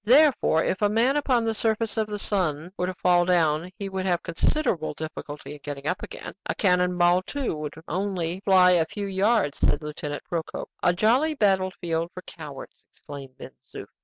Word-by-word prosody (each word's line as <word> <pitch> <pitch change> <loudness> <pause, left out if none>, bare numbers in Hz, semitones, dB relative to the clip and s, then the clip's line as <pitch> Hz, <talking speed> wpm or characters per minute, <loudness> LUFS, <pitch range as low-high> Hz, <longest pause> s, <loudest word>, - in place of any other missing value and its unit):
"Therefore, 255 - +5
if 185 - -1
a 205 - +4
man 235 +6 +2
upon 255 -5 +2
the 225 - +1
surface 220 0 -1
of 220 -2 0
the 210 -1 -4
sun 175 -5 -1
were 180 -1 -1
to 185 - -2
fall 175 0 +3
down, 170 -2 +2
he 200 - -4
would 190 -1 -3
have 175 -2 +1
considerable 170 - 0
difficulty 150 -2 -7
in 150 - -11
getting 145 -1 -6
up 180 +4 -1
again. - - -8
A - - -1
cannon 180 -2 +2
ball, 175 +1 +4
too, 270 - -3
would 150 -1 -5
only 185 -2 -2
fly 190 -2 +5
a 170 -3 +4
few 205 -1 -5
yards," 195 -4 +1
said - - +2
Lieutenant 150 -1 -5
Procope. 165 -2 -5
"A 175 - +4
jolly 245 - +2
battle 190 -6 +2
field 165 -1 -1
for 185 - -7
cowards!" 145 -5 -10
exclaimed 135 -2 -11
Ben - - -9 0.2
Zoof. - - -6
180 Hz, 190 wpm, -25 LUFS, 160-210 Hz, 0.2 s, Therefore